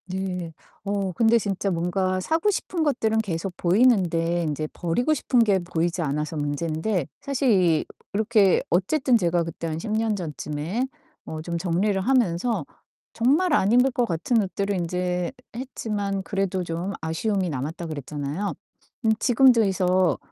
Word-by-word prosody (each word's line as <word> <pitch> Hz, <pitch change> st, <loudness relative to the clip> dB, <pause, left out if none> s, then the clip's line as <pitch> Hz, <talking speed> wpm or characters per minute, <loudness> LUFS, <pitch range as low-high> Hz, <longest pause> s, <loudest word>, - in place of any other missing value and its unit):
네. 180 Hz, -3 st, -4 dB, 0.3 s
어 200 Hz, -1 st, -1 dB
근데 230 Hz, +4 st, +4 dB
진짜 200 Hz, -2 st, -1 dB
뭔가 185 Hz, +2 st, 0 dB
사고 320 Hz, -, +1 dB
싶은 355 Hz, -3 st, -2 dB
것들은 225 Hz, -7 st, +1 dB
계속 185 Hz, -3 st, -3 dB
보이는데 175 Hz, -5 st, +2 dB
인제 155 Hz, -1 st, -2 dB
버리고 215 Hz, -, 0 dB
싶은 260 Hz, -3 st, +1 dB
게 200 Hz, -4 st, +3 dB
보이지 175 Hz, 0 st, -1 dB
않아서 150 Hz, +1 st, -2 dB
문제인데 155 Hz, +4 st, -1 dB
사실 275 Hz, -2 st, +1 dB
이 175 Hz, -6 st, +3 dB, 0.3 s
이렇게 210 Hz, -2 st, +3 dB
어쨌든 250 Hz, -, +2 dB
제가 175 Hz, -3 st, +1 dB
그때 165 Hz, 0 st, -5 dB
한 155 Hz, -1 st, -3 dB
10 210 Hz, -, -5 dB
년 220 Hz, 0 st, +1 dB
전쯤에 165 Hz, -, -3 dB, 0.4 s
어 155 Hz, 0 st, -6 dB
좀 170 Hz, +1 st, -3 dB
정리를 190 Hz, +4 st, 0 dB
하면서 235 Hz, -2 st, +1 dB, 0.5 s
정말 295 Hz, +9 st, +2 dB
안 200 Hz, -7 st, +3 dB
입을 250 Hz, +3 st, +5 dB
것 245 Hz, -1 st, +1 dB
같은 195 Hz, +6 st, +1 dB
옷들은 200 Hz, +1 st, -2 dB
인제 180 Hz, 0 st, -1 dB, 0.2 s
했지만 210 Hz, -6 st, -3 dB
그래도 195 Hz, -2 st, -1 dB
좀 170 Hz, +3 st, -3 dB
아쉬움이 185 Hz, +4 st, -1 dB
남았다 155 Hz, +4 st, -4 dB
그랬잖아요? 150 Hz, +4 st, -4 dB, 0.5 s
음 220 Hz, -, +5 dB
지금도 245 Hz, -1 st, +5 dB
그래서 185 Hz, -5 st, +2 dB
190 Hz, 305 characters per minute, -24 LUFS, 170-220 Hz, 0.5 s, 입을